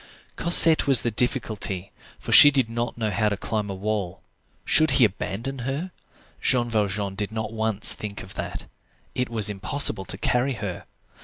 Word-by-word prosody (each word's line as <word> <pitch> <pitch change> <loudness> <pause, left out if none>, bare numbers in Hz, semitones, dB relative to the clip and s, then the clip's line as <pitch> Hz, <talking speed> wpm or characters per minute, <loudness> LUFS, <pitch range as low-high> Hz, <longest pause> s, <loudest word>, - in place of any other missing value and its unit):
Cosette 165 -2 +5
was 135 -3 +5
the 120 - -1
difficulty, 105 -5 -2 0.3
for - - -8
she 145 - +9
did 135 -5 0
not 120 0 -4
know 110 -2 -2
how 105 +2 0
to 105 - -4
climb 105 0 -4
a 95 - -5
wall. 100 -2 -4 0.4
Should 155 0 +3
he 125 - +5
abandon 110 +6 -5
her? 140 +9 -5 0.5
Jean 120 -2 0
Valjean 100 -2 -2
did 105 +1 -5
not 110 0 -5
once 110 -2 +2
think 105 -1 -8
of 95 - -13
that. - - -7 0.5
It 125 -1 -3
was 110 -3 +2
impossible 105 0 -1
to - - -1
carry 125 +3 -1
her. 100 -6 -7
110 Hz, 170 wpm, -23 LUFS, 100-125 Hz, 0.5 s, she